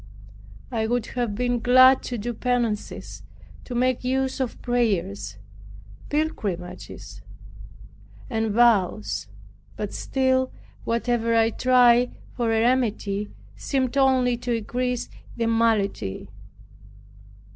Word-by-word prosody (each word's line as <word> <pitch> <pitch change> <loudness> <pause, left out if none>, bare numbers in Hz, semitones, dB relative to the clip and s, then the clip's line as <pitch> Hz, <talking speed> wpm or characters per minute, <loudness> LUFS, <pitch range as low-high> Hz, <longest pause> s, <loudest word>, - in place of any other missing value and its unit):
I 220 -2 -1
would 240 0 0
have 240 -5 -2
been 245 +1 0
glad 255 +2 +6
to 245 - -3
do 240 +3 -3
penances, 235 -3 -2 0.4
to 245 - -6
make 255 0 +1
use 265 +1 -1
of 260 -3 -3
prayers, 170 - -1 0.7
pilgrimages, 185 - -4 1.1
and 225 0 -1
vows. 215 -3 +2 0.5
But - - -5
still, 260 -1 0 0.3
whatever 230 0 0
I 225 0 +3
tried 245 0 +4 0.2
for 235 -2 0
a 225 0 +2
remedy 215 -4 0 0.3
seemed 265 -2 -1
only 260 -3 +3
to 245 0 -2
increase 245 +2 -2 0.3
the 230 - 0
malady. 225 - 0
240 Hz, 105 wpm, -24 LUFS, 220-250 Hz, 1.1 s, glad